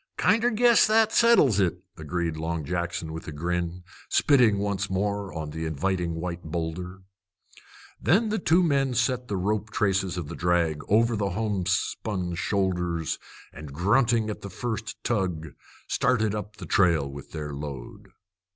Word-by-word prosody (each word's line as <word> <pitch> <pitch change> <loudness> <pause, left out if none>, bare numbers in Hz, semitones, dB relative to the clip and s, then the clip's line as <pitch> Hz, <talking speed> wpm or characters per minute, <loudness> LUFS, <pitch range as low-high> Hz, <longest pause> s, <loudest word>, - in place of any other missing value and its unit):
"Kinder 230 +2 +3
guess 235 0 +5
that 220 0 +4
settles 225 - +5
it," 90 -2 0
agreed 80 +1 -3
Long 80 -1 -3
Jackson 85 -1 -3
with 80 - -7
a - - -4
grin, 85 +3 -3 0.3
spitting 125 -8 +4
once 100 -1 -1
more 100 +1 -1
on 80 -2 -5
the 80 +1 -4
inviting 85 +2 -1
white 85 +1 -4
boulder. 85 +3 -5 1.0
Then 200 - +3
the 215 0 0
two 175 +1 +3
men 135 -5 +1
set 125 0 0
the 100 - -2
rope 105 +3 -1
traces 95 -4 0
of 85 -4 -4
the - - -7
drag 85 -3 +1
over 115 +3 +3
the 100 -2 -1
homespun 95 -1 -1
shoulders, 90 -3 -1 0.3
and, 75 -1 -9
grunting 110 - +2
at - - -8
the 100 - -7
first 110 +1 -5
tug, 90 -8 -1 0.4
started 115 -6 +1
up 105 0 -5
the - - -9
trail 85 -7 +3
with 70 0 -10
their 75 -2 -5
load. 70 -4 -7
95 Hz, 150 wpm, -26 LUFS, 85-110 Hz, 1.0 s, guess